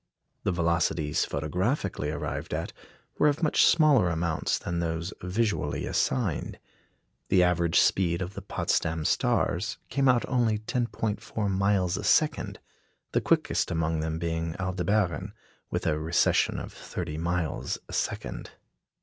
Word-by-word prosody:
The - - +2
velocities 85 -3 +1
photographically 90 - -1
arrived 75 -1 -3
at - - -4 0.5
were 150 - +5
of 150 +3 +1
much 155 - +4
smaller 150 - +5
amounts 80 -1 0
than 85 - -3
those 85 +2 -2
visually 105 +4 -1
assigned. 65 -1 -1 0.7
The 90 -2 +5
average 85 -2 +3
speed 85 -3 +2
of 90 +1 -4
the 100 - -7
Potsdam 80 -4 -1
stars 95 +7 +1
came 135 -1 +2
out 120 -2 +3
only 120 -5 +2
10·4 110 -2 -2
miles 95 -2 +1
a - - -5
second, - - +2 0.5
the - - +1
quickest - - +1
among 80 -1 0
them 80 0 -2
being 80 0 -2
Aldebaran, 95 +2 0 0.3
with - - -2
a 75 -2 +1
recession 80 +2 +2
of - - -8
thirty 80 -3 -5
miles 85 -1 -1
a - - -10
second. - - -3
90 Hz, 130 wpm, -28 LUFS, 80-105 Hz, 0.7 s, were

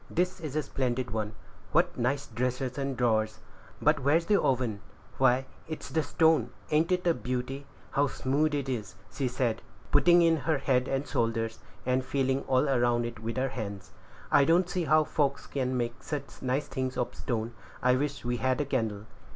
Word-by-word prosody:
This 180 +2 0
is 155 -4 -6
a 155 - +1
splendid 125 -2 -2
one; 110 -1 -2 0.4
what - - +3
nice 135 +4 0
dressers 125 +3 -2
and 135 -2 -2
drawers! 110 -3 +1 0.4
but 150 0 +3
where 140 +3 +3
is 165 0 +2
the 205 +1 +3
oven? 120 -6 0 0.4
Why, 130 0 +4 0.2
it's 155 0 -7
stone; 160 -7 +3 0.2
ain't 160 +4 +3
it 180 0 +1
a 170 - +4
beauty; 130 +1 -4 0.2
how 145 +1 +2
smooth 145 +3 0
it 140 -2 -2
is!" 110 -8 -4 0.2
said 125 -4 0
she, - - -24 0.3
putting 175 +4 +6
in 165 -1 +4
her 155 +1 0
head 130 -2 +1
and 135 +1 -1
shoulders, 115 -2 -1 0.3
and 130 +1 +1
feeling 135 +1 0
all 130 +3 +3
around 120 -3 +2
it 120 -2 -6
with 115 +2 -4
her 135 +1 +1
hands. 100 -7 -6 0.4
"I 145 - +6
don't 170 +5 +4
see 180 -2 -1
how 155 0 +5
folks 140 -2 0
can 130 -2 -1
make 120 0 -3
such 145 -2 -6
nice 130 +3 0
things 130 -1 -3
of 125 0 -1
stone. 115 -1 -3 0.3
I 125 0 +5
wish 140 0 -2
we 120 0 0
had 130 +1 +1
a 145 - +1
candle." 110 -6 -1
130 Hz, 185 wpm, -29 LUFS, 120-145 Hz, 0.4 s, putting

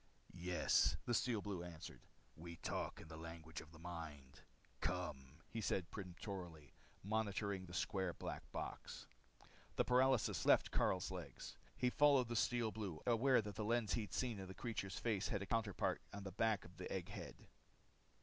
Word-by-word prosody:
"Yes," 90 0 +3
the 120 - +1
Steel 115 -3 +2
Blue 95 -4 -2
answered. 85 -1 -8 0.3
"We 85 +2 -7
talk - - -2
in - - -10
the 80 -1 -8
language 80 0 -6
of 75 - -13
the 80 - -12
mind. 80 -5 -7 0.4
Come!" 75 -4 -3
he 115 - -2
said 95 -3 0
peremptorily, 90 -5 -6 0.3
motioning 100 -1 0
with 95 - -9
the 85 - -9
square 95 -2 +1
black - - -5
box. - - -5 0.7
The - - +3
paralysis 130 -1 +4
left - - +6
Karyl's 90 -1 +2
legs. - - -6 0.2
He 125 -1 +3
followed 140 -4 +6
the 120 - -1
Steel 115 0 +2
Blue, 95 -6 -4
aware 125 +1 +5
that 105 0 -4
the 110 - -2
lens 115 0 +2
he'd 110 -3 -1
seen 120 -6 0
on 95 - -6
the 95 - -8
creature's 105 -5 -3
face 105 -4 +1
had 100 -1 0
a - - -4
counterpart 105 -4 +1
on 100 -1 -6
the 95 - -4
back 110 +1 +2
of 85 0 -14
the - - -5
egg - - -2
head. - - -6
100 Hz, 175 wpm, -41 LUFS, 85-115 Hz, 0.7 s, left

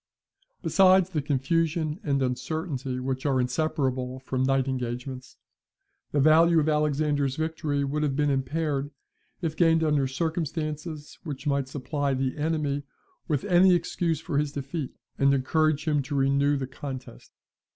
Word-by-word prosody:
Besides 190 -1 +5
the 155 -4 0
confusion 155 +3 0
and 140 -8 0
uncertainty 130 0 -3
which 130 0 -3
are 135 -2 +2
inseparable 130 -1 -1
from 130 0 -3
night 135 0 +2
engagements, 125 0 -4 0.7
the 145 - +1
value 160 +3 +6
of 155 - +1
Alexander's 150 -2 +1
victory 155 -2 -1
would 145 +2 -1
have 145 -3 0
been 145 0 +2
impaired, 140 +1 -1 0.5
if 160 -2 -1
gained 165 0 +4
under 150 -3 +2
circumstances 155 +1 -3
which 150 -3 -6
might 140 -2 0
supply 140 0 -2
the 130 0 -1
enemy 150 -2 -1 0.5
with 145 -5 0
any 185 -1 +5
excuse 165 -2 -1
for 145 -2 -1
his 150 -1 -1
defeat, 140 0 -4 0.3
and 140 0 +4
encourage 155 +3 +1
him 150 -2 +2
to 135 +2 -5
renew 140 +1 +2
the 135 - -2
contest. 130 -1 -8
145 Hz, 140 wpm, -27 LUFS, 135-160 Hz, 0.7 s, value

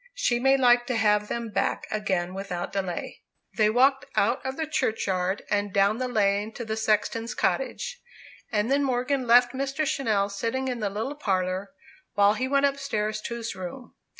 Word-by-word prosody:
She 240 - +1
may 270 +2 +4
like 245 -2 +4
to 250 - -1
have 210 -1 +2
them 235 0 -3
back - - -1
again 190 -4 -1
without 190 -2 -5
delay." 190 -3 -4 0.3
They 215 0 +4
walked 265 +4 +3
out 235 +6 +2
of 265 0 -4
the 320 - -1
churchyard, 200 -9 -1
and 205 -1 0
down 200 +4 +2
the 255 - -1
lane 210 -2 +1
to 235 - -6
the 220 0 -2
sexton's 220 +1 0
cottage. - - -1 0.5
And 215 +3 0
then 285 +1 +3
Morgan 255 0 0
left 245 +1 +6
Mr. 275 +3 -2
Channell 210 -8 0
sitting 230 +6 -2
in 245 -2 -3
the 210 -2 -1
little 220 +8 -3
parlour, 190 -7 -1 0.5
while 205 0 +5
he 255 +4 -2
went 280 +1 +3
upstairs 215 -7 -1
to 235 - -5
his 230 -1 -5
room. 185 +8 -8
225 Hz, 175 wpm, -26 LUFS, 205-260 Hz, 0.5 s, left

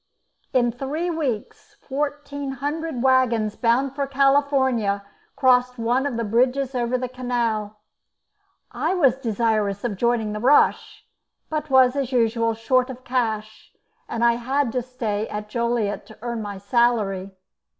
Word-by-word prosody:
In 240 -2 +2
three 290 +8 -3
weeks 275 -10 -4
fourteen 285 0 -4
hundred 290 0 -3
waggons 240 -5 +2
bound 255 +3 +1
for 280 0 -2
California 270 -7 +2 0.3
crossed 250 -1 +3
one 240 +4 +1
of 250 -5 -3
the 230 - -1
bridges 250 +5 +1
over 245 0 0
the 255 0 -3
canal. 235 -4 -2 0.9
I 375 - -1
was 275 -9 +4
desirous 215 -4 0
of 225 -5 -2
joining 235 -1 0
the 210 - -4
rush, 265 +6 +2 0.5
but 305 -1 -2
was, 260 -1 +5
as 275 -2 -2
usual, 230 -2 +1
short 255 +3 +1
of 255 0 -9
cash, 220 -4 -3 0.4
and 235 +1 0
I 235 0 +4
had 265 +1 0
to 250 +1 -1
stay 225 -4 -3
at 210 0 -6
Joliet 235 -2 -1
to 220 - -14
earn 235 -2 -3
my 205 -2 -6
salary. 200 -3 0
245 Hz, 140 wpm, -23 LUFS, 225-270 Hz, 0.9 s, was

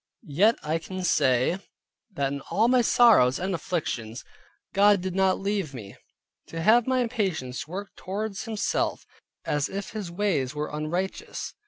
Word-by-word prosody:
Yet 210 +9 +5
I 155 +2 -1
can 185 +2 -6
say, 140 0 +2 0.5
that 140 -3 -1
in 140 - -5
all 225 +3 +3
my 250 0 +4
sorrows 220 - +5
and 190 +2 -2
afflictions, 130 -9 -3 0.5
God 205 0 +5
did 185 0 -4
not 190 0 +2
leave 195 -8 -2
me 100 -5 -9 0.5
to 165 - -6
have 230 +5 +5
my 260 -1 +2
impatience 190 - -2
work 195 +4 -6
towards 200 +3 -4
Himself, 220 -3 -1 0.4
as 145 -1 0
if 200 0 -5
His 210 -5 -5
ways 170 -8 -1
were 150 +1 -3
unrighteous. 175 +5 -4
185 Hz, 150 wpm, -26 LUFS, 150-205 Hz, 0.5 s, Yet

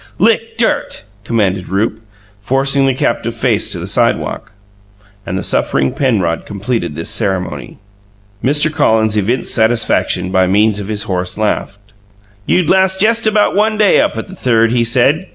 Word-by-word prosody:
"Lick 225 +3 +1
dirt," 230 - -1 0.2
commanded 100 -5 -1
Rupe, 100 +4 -1 0.4
forcing 135 +4 +2
the 135 - +1
captive's - - -2
face - - +1
to - - 0
the - - -6
sidewalk; - - -1 0.8
and 90 - -3
the - - -4
suffering 65 -1 +1
Penrod 95 - 0
completed 105 -4 -3
this - - -5
ceremony. 95 -2 -3 0.7
Mr. 150 +3 +2
Collins 110 -8 +2
evinced 115 +4 -1
satisfaction 110 -5 +1
by 95 -1 +2
means 105 +2 +2
of 100 - -6
his 105 -1 -2
horse 90 -1 -3
laugh. 105 -2 -2 0.7
"You'd 180 -3 +1
last 190 +1 +2
jest 225 +2 +3
about 210 -2 +2
one 215 +1 +1
day 210 -2 +4
up - - -1
at - - -5
the 190 - -11
Third!" 115 -6 +1
he 120 -1 +1
said. 130 +9 +1
115 Hz, 155 wpm, -14 LUFS, 100-160 Hz, 0.8 s, day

